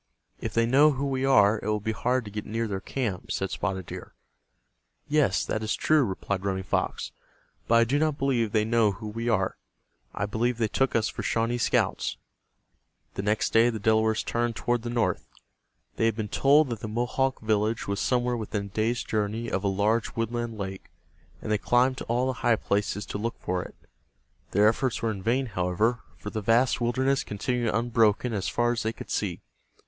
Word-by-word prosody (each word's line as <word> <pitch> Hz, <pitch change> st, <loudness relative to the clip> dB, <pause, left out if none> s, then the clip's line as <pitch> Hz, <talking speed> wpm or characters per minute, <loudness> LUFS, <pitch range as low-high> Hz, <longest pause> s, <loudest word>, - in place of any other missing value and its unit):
"If -, -, -5 dB
they 115 Hz, 0 st, +4 dB
know 145 Hz, +5 st, +5 dB
who 135 Hz, +1 st, -2 dB
we 135 Hz, -1 st, -1 dB
are, 105 Hz, -5 st, +5 dB
it -, -, -6 dB
will 105 Hz, 0 st, +1 dB
be 110 Hz, +2 st, -2 dB
hard 125 Hz, +3 st, 0 dB
to 105 Hz, -, -8 dB
get 105 Hz, 0 st, -4 dB
near 115 Hz, +1 st, -2 dB
their 95 Hz, -2 st, -3 dB
camp," 110 Hz, -8 st, -3 dB
said 95 Hz, -, -2 dB
Spotted 95 Hz, -3 st, -2 dB
Deer. -, -, -9 dB, 0.9 s
"Yes, 150 Hz, -1 st, +2 dB
that 110 Hz, -, -2 dB
is 110 Hz, 0 st, -1 dB
true," 155 Hz, -2 st, +3 dB
replied 95 Hz, -2 st, -3 dB
Running 95 Hz, -1 st, -1 dB
Fox. -, -, -2 dB, 0.6 s
"But 115 Hz, -, +4 dB
I 115 Hz, -, +6 dB
do 135 Hz, +5 st, +1 dB
not 155 Hz, -2 st, +1 dB
believe 125 Hz, -6 st, +1 dB
they 110 Hz, -1 st, +2 dB
know 115 Hz, -2 st, +3 dB
who 105 Hz, +3 st, -8 dB
we 115 Hz, +3 st, -3 dB
are. 95 Hz, -5 st, +1 dB, 0.6 s
I 100 Hz, -, -1 dB
believe 115 Hz, +3 st, -1 dB
they 115 Hz, -2 st, +1 dB
took 135 Hz, +5 st, 0 dB
us 110 Hz, -2 st, +2 dB
for -, -, -5 dB
Shawnee 115 Hz, +2 st, 0 dB
scouts." -, -, 0 dB, 1.0 s
The -, -, -3 dB
next 105 Hz, +2 st, 0 dB
day 115 Hz, +1 st, +6 dB
the 115 Hz, -, -3 dB
Delawares 110 Hz, +1 st, +2 dB
turned 120 Hz, -1 st, -1 dB
toward 120 Hz, +1 st, 0 dB
the 120 Hz, -, -5 dB
north. 120 Hz, -1 st, 0 dB, 0.7 s
They -, -, +2 dB
had 115 Hz, -, 0 dB
been 110 Hz, -2 st, -4 dB
told 145 Hz, +4 st, +4 dB
that 115 Hz, -3 st, -4 dB
the 110 Hz, -, -5 dB
Mohawk 120 Hz, +4 st, -1 dB
village 110 Hz, +1 st, 0 dB
was 100 Hz, 0 st, -1 dB
somewhere 125 Hz, -1 st, +1 dB
within 105 Hz, -3 st, -3 dB
a -, -, -9 dB
day's 110 Hz, +4 st, 0 dB
journey 110 Hz, +2 st, -2 dB
of 95 Hz, -, -1 dB
a -, -, +1 dB
large 105 Hz, +4 st, +1 dB
woodland 115 Hz, 0 st, -2 dB
lake, 95 Hz, -1 st, -6 dB, 0.5 s
and 110 Hz, -, -3 dB
they 105 Hz, -, +2 dB
climbed 130 Hz, +3 st, +2 dB
to -, -, -6 dB
all 120 Hz, +2 st, +1 dB
the 130 Hz, -, 0 dB
high 120 Hz, -, +4 dB
places 105 Hz, 0 st, -1 dB
to 100 Hz, -, -5 dB
look 115 Hz, +2 st, -2 dB
for 90 Hz, 0 st, -2 dB
it. -, -, -10 dB, 0.7 s
Their 105 Hz, +2 st, +4 dB
efforts 120 Hz, +2 st, 0 dB
were 115 Hz, -, +1 dB
in 100 Hz, -3 st, -6 dB
vain, 125 Hz, +6 st, +1 dB
however, 105 Hz, +3 st, 0 dB, 0.2 s
for 105 Hz, -, -7 dB
the 110 Hz, -, -3 dB
vast 120 Hz, +5 st, +3 dB
wilderness 130 Hz, +3 st, +1 dB
continued 115 Hz, +2 st, -1 dB
unbroken 115 Hz, 0 st, +2 dB
as 100 Hz, -3 st, -1 dB
far 120 Hz, 0 st, +1 dB
as 120 Hz, -, -1 dB
they 110 Hz, +1 st, -1 dB
could -, -, -9 dB
see. -, -, -2 dB
115 Hz, 205 wpm, -27 LUFS, 105-120 Hz, 1.0 s, I